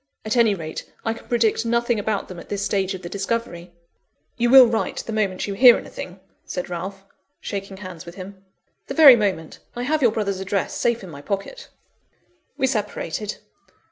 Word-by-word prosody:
At 215 - -1
any 230 -4 +4
rate, 160 -3 -7
I 225 - +1
can 230 - -14
predict 230 -2 +1
nothing 235 -1 +1
about 205 -1 -2
them 180 -2 -9
at - - -13
this 200 -1 -2
stage 195 -1 0
of 185 - -10
the - - -5
discovery." 195 -3 -4 0.6
"You 240 0 +1
will 260 0 +10
write 230 -1 -2
the 225 - -5
moment 200 -4 -1
you 200 - -4
hear 245 +3 +7
anything?" 180 +1 -8 0.2
said 180 -1 -5
Ralph, 195 +3 -6 0.3
shaking 195 -1 -6
hands 185 -4 -9
with 170 - -9
him. 190 0 -10 0.4
"The - - -5
very 290 -6 +10
moment. 195 -8 -2 0.2
I 245 - -3
have 305 +4 0
your 240 -4 +4
brother's 200 -3 -2
address 195 0 -2
safe 235 -2 0
in 185 - -9
my 140 -2 -10
pocket." 200 - -5 0.9
We 265 - +2
separated. 210 -4 -3
205 Hz, 185 wpm, -22 LUFS, 190-235 Hz, 0.9 s, will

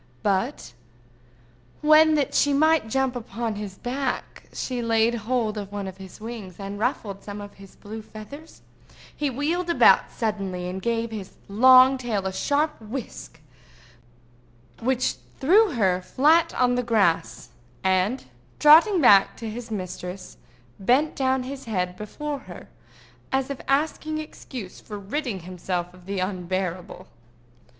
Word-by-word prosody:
But 200 - -1 1.1
when, 310 +1 +6
that 290 -3 0
she 285 - +3
might 315 -2 +3
jump 265 +1 0
upon 230 -1 -4
his 205 -2 -7
back, 255 +1 -4
she 250 -2 -3
laid 230 0 +2
hold 225 -1 -1
of 200 -1 -7
one 200 -1 -4
of 190 0 -8
his 190 +1 -12
wings, 215 -5 -8
and 200 +1 -6
ruffled 210 -4 -2
some 205 0 -7
of 205 0 -10
the 195 - -11
blue 220 +2 -8
feathers, 215 +9 -12 0.5
he 295 -1 -1
wheeled 310 +7 -1 0.4
suddenly 195 -5 -3
about, 185 +1 -5
gave 230 +1 -1
his 205 -4 -7
long 255 +5 +6
tail 220 -6 -2
a 190 - -2
sharp 290 +6 0
whisk 225 +3 -8 1.4
which 255 +1 0 0.2
threw 380 +6 +4
her 190 -6 +1
flat 315 - +3
on 250 -1 +3
the 250 - +1
grass, 175 - 0 0.3
and, 190 +6 +1 0.3
trotting 330 +5 +7
back 200 -7 +6
to 230 - -6
his 230 +2 -7
mistress, 185 -2 -6 0.4
bent 255 +10 +2
down 260 -1 +1
his 270 +1 -7
head 180 -5 -2
before 280 +9 -5
her - - -12 0.6
as 265 +1 0
if 275 - -6
asking 310 +2 0
excuse 255 -9 -8
for 210 - -8
ridding 205 - -4
himself 180 0 -4
of 180 0 -17
the 200 0 -3
unbearable. 185 -1 -3
225 Hz, 140 wpm, -24 LUFS, 195-270 Hz, 1.4 s, trotting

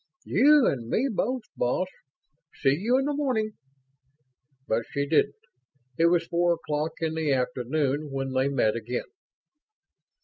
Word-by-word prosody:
"You 295 -1 +5
and 115 -4 -1
me 265 - +1
both, 250 +4 -1
boss. 125 +9 0 0.7
See 135 - +2
you 225 - +1
in 270 - +1
the 295 - 0
morning." 255 -7 0 1.2
But 110 +1 +1
she 140 0 -1
didn't. 155 +1 +2 0.6
It 165 +5 +4
was 170 -1 +2
four 175 0 +2
o'clock 155 -1 -3
in 160 -1 0
the 160 -2 0
afternoon 135 +3 -1
when 135 -1 -3
they 130 +1 +2
met 120 -6 +1
again. 115 +2 -3
155 Hz, 140 wpm, -26 LUFS, 135-215 Hz, 1.2 s, You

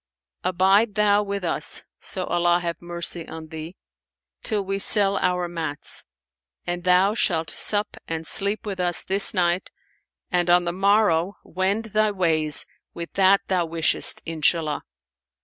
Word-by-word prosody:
Abide 195 +4 +2
thou 210 -1 +3
with 200 -1 -4
us 170 - 0 0.2
(so - - -5
Allah 175 0 +1
have 170 -1 -5
mercy 170 -1 -3
on 160 -1 -9
thee!) 160 +2 -8 0.7
till 210 -3 -2
we 195 +1 -2
sell 200 -1 +5
our 180 -1 0
mats; 160 -4 -3 0.6
and 175 0 -4
thou 185 +3 +4
shalt 165 -7 0
sup 205 0 -1
and 165 0 -4
sleep 200 +6 +1
with 195 -3 -5
us 175 -1 +1
this 195 +1 +4
night 175 0 0 0.6
and 175 -1 +1
on 175 0 +4
the 170 - -2
morrow 195 -2 +2
wend 195 +5 -2
thy 215 0 +3
ways 160 -6 0 0.3
with 170 0 -7
that 195 0 +4
thou 180 -3 0
wishest, 165 0 +1
Inshallah!' 160 -1 0
180 Hz, 145 wpm, -23 LUFS, 170-200 Hz, 0.7 s, sell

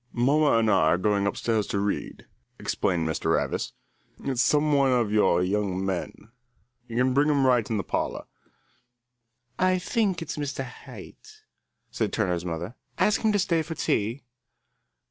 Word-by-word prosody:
"Mamma 145 +5 +3
and 115 -1 +2
I 105 - +4
are 80 - +3
going 100 +1 +1
upstairs 110 0 -1
to - - -2
read," 100 0 -3 0.3
explained 85 -4 -1
Mr. 80 +1 0
Ravis. - - -2 0.5
"It's 130 -3 0
some 150 +2 +3
one 140 -2 +3
of 120 -4 +1
your 95 -4 +3
young 95 -1 -1
men. 95 +4 -4 0.6
You 115 - -5
can 130 +1 +2
bring 145 +3 +3
him 140 -2 +3
right 125 -4 +3
in 110 - 0
the 100 - -2
parlour." - - -3 1.3
"I 185 0 +3
think 190 -2 0
it's 165 - -6
Mr. 140 -2 -3
Haight," 430 - -13 0.5
said - - -1
Turner's 90 -5 -1
mother. 85 +5 -4 0.2
"Ask 210 - +2
him 220 - +2
to - - +3
stay 180 -4 +1
to 160 +1 -6
tea." 115 0 -1
120 Hz, 160 wpm, -26 LUFS, 100-150 Hz, 1.3 s, I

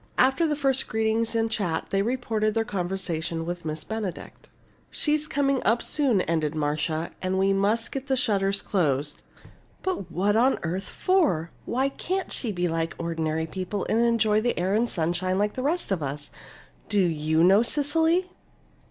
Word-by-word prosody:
After 265 +6 +4
the 300 - 0
first 270 -2 0
greetings 220 +1 0
and 225 0 +1
chat 180 -7 -2
they 195 - +2
reported 220 -2 0
their 225 0 +1
conversation 175 -4 -3
with 175 0 -4
Miss 155 0 -4
Benedict. 220 -5 -6 0.4
"She's 300 0 0
coming 275 -2 +1
up 230 +3 +2
soon," 260 -10 +2
ended 160 -3 -1
Marcia, 155 +2 -1
"and 185 0 -1
we 195 +1 +3
must 210 +4 +1
get 270 0 -5
the 265 -1 +1
shutters 200 -4 +1
closed. 145 -6 0 0.6
But 370 - -3
what 200 +5 +1
on 250 +4 +4
earth 180 +4 -3
for? 295 - +1
Why 265 +3 0
can't 375 +7 -3
she 235 - -1
be 180 -2 0
like 165 0 -2
ordinary 160 -1 -1
people 185 +4 -4
and 230 +2 +3
enjoy 220 -2 +3
the 240 +2 0
air 185 +3 0
and 230 +3 +2
sunshine 175 +2 0
like 210 +1 +1
the 255 - -4
rest 310 - -1
of 185 -4 0
us? 145 +1 -5 0.6
Do 205 -1 +3
you 160 0 +1
know, 195 +4 +6
Cecily?" 320 +8 +1
200 Hz, 170 wpm, -26 LUFS, 170-245 Hz, 0.6 s, know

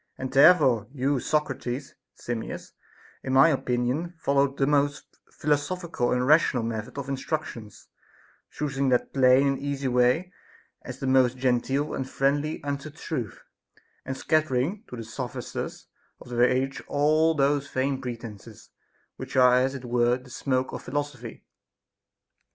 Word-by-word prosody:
And 130 0 -5
therefore 135 - +5
your 140 0 0
Socrates, 135 -2 -2 0.2
Simmias, 120 -2 -6 0.5
in 130 - -3
my 135 +4 +7
opinion 130 +5 -1
followed 140 -2 +1
the 135 - +2
most 145 0 0
philosophical 150 -1 -1
and 125 0 +1
rational 145 -4 +4
method 115 +3 -5
of 140 -1 -4
instructions, 135 -6 -5 0.6
choosing 140 -2 -1
that 125 -1 +1
plain 130 0 +5
and 135 -1 0
easy 140 -1 -3
way 125 +9 +2 0.5
as 130 -1 -8
the 135 - -5
most 130 -1 +3
genteel 130 +3 0
and 130 -1 -4
friendly 145 +3 0
unto 145 +1 -4
truth, 150 -6 -6 0.6
and 135 - -5
scattering 155 - 0
to - - -7
the 115 - -6
sophisters 120 +2 -6 0.3
of - - -13
the 120 0 +3
age 135 +1 -1
all 155 +3 +3
those 140 0 +1
vain 135 +1 -1
pretences 115 -3 -8 0.5
which - - -8
are 125 -1 +6
as 130 +2 +1
it 130 -2 -7
were 120 0 +2
the 125 0 -16
smoke 130 0 -1
of - - -5
philosophy. 130 -4 -5
135 Hz, 140 wpm, -26 LUFS, 125-145 Hz, 0.6 s, my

